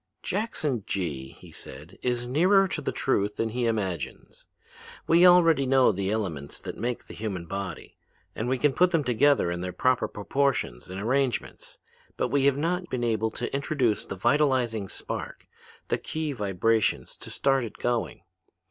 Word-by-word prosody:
'Jackson 155 Hz, -, -2 dB
Gee,' 75 Hz, -9 st, -3 dB
he -, -, -15 dB
said, 80 Hz, +5 st, -10 dB
'is 120 Hz, -1 st, -1 dB
nearer 185 Hz, +10 st, +4 dB
to -, -, -3 dB
the -, -, -2 dB
truth 105 Hz, -5 st, 0 dB
than 115 Hz, -, 0 dB
he 120 Hz, +1 st, -1 dB
imagines. 95 Hz, -, -4 dB, 0.6 s
We 170 Hz, +2 st, +6 dB
already 165 Hz, -6 st, +5 dB
know 130 Hz, -2 st, +5 dB
the 95 Hz, -1 st, -2 dB
elements 90 Hz, -10 st, -3 dB
that -, -, -7 dB
make 120 Hz, +1 st, -3 dB
the -, -, -11 dB
human 100 Hz, -6 st, -4 dB
body, 95 Hz, -2 st, -6 dB, 0.4 s
and 115 Hz, +3 st, -2 dB
we 130 Hz, -, +1 dB
can 145 Hz, +2 st, +2 dB
put 180 Hz, +5 st, +4 dB
them 165 Hz, -4 st, +1 dB
together 125 Hz, -5 st, +3 dB
in 85 Hz, 0 st, -3 dB
their 90 Hz, 0 st, -3 dB
proper 130 Hz, +5 st, +1 dB
proportions 110 Hz, -, -1 dB
and 95 Hz, +1 st, -5 dB
arrangements: 130 Hz, +3 st, -1 dB, 0.4 s
but -, -, 0 dB
we 140 Hz, -1 st, +2 dB
have 140 Hz, -1 st, +4 dB
not 175 Hz, +4 st, -1 dB
been 125 Hz, -2 st, -2 dB
able 110 Hz, -1 st, +1 dB
to -, -, -5 dB
introduce 140 Hz, -6 st, 0 dB
the -, -, -6 dB
vitalizing 120 Hz, -4 st, +1 dB
spark, -, -, -6 dB, 0.4 s
the -, -, +1 dB
key 155 Hz, -1 st, -3 dB
vibrations 105 Hz, -, 0 dB
to -, -, -8 dB
start 135 Hz, -2 st, +1 dB
it 115 Hz, -, -7 dB
going. 120 Hz, -1 st, -2 dB
120 Hz, 165 wpm, -27 LUFS, 100-140 Hz, 0.6 s, We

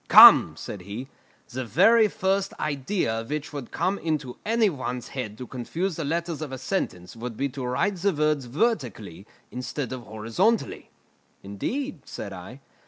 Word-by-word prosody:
"Come," -, -, +10 dB
said 100 Hz, -, -7 dB
he, 105 Hz, +8 st, -7 dB, 0.4 s
"the 130 Hz, 0 st, -4 dB
very 220 Hz, -, +5 dB
first 195 Hz, 0 st, 0 dB
idea 140 Hz, -, -1 dB
which 150 Hz, +4 st, -4 dB
would 140 Hz, -5 st, -6 dB
come 195 Hz, +2 st, -1 dB
into 150 Hz, -6 st, -2 dB
any 225 Hz, 0 st, +3 dB
one's 125 Hz, -, -4 dB
head 110 Hz, -6 st, -5 dB
to 125 Hz, -, -6 dB
confuse 160 Hz, -, -3 dB
the 165 Hz, -, -3 dB
letters 165 Hz, +1 st, -2 dB
of 150 Hz, -3 st, -5 dB
a 130 Hz, -, -4 dB
sentence 120 Hz, -, -3 dB
would 115 Hz, -1 st, -6 dB
be 140 Hz, -, 0 dB
to 135 Hz, 0 st, -6 dB
write 140 Hz, +11 st, 0 dB
the 200 Hz, +3 st, +2 dB
words 150 Hz, -3 st, +1 dB
vertically 120 Hz, -, -2 dB, 0.2 s
instead 125 Hz, +1 st, -4 dB
of 130 Hz, -, -5 dB
horizontally." 115 Hz, -, -1 dB, 0.5 s
"Indeed!" 250 Hz, -, -3 dB
said -, -, -7 dB
I. -, -, -10 dB
140 Hz, 160 wpm, -26 LUFS, 120-185 Hz, 0.5 s, Come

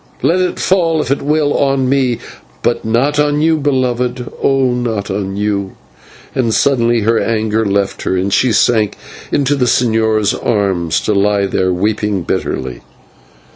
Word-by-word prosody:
Let 175 Hz, +3 st, +2 dB
it 180 Hz, -1 st, -1 dB
fall, 170 Hz, -4 st, +1 dB
if 150 Hz, -, -2 dB
it 140 Hz, -, 0 dB
will, 145 Hz, 0 st, +1 dB
on 135 Hz, -2 st, +1 dB
me, 130 Hz, -3 st, +1 dB, 0.5 s
but 120 Hz, -, 0 dB
not 130 Hz, +7 st, +1 dB
on 150 Hz, 0 st, +2 dB
you, 160 Hz, +1 st, +2 dB
beloved 125 Hz, -3 st, -1 dB
oh! 135 Hz, -2 st, +2 dB
not 115 Hz, -5 st, -2 dB
on 95 Hz, 0 st, -3 dB
you 100 Hz, -2 st, -2 dB, 0.3 s
" -, -, -23 dB
and 120 Hz, -3 st, 0 dB
suddenly 120 Hz, -2 st, +2 dB
her 115 Hz, +2 st, +2 dB
anger 110 Hz, -1 st, 0 dB
left 100 Hz, -1 st, -1 dB
her, 95 Hz, -, -1 dB
and 95 Hz, +2 st, -1 dB
she 130 Hz, -, +3 dB
sank 110 Hz, -1 st, +2 dB, 0.3 s
into 140 Hz, 0 st, +1 dB
the 135 Hz, -3 st, +1 dB
señor's 110 Hz, -3 st, +2 dB
arms 95 Hz, -6 st, -1 dB
and 105 Hz, -, +2 dB
lay 100 Hz, -1 st, +1 dB
there 95 Hz, -1 st, 0 dB
weeping 105 Hz, 0 st, -1 dB
bitterly. 65 Hz, -5 st, -3 dB
115 Hz, 160 wpm, -15 LUFS, 100-135 Hz, 0.5 s, she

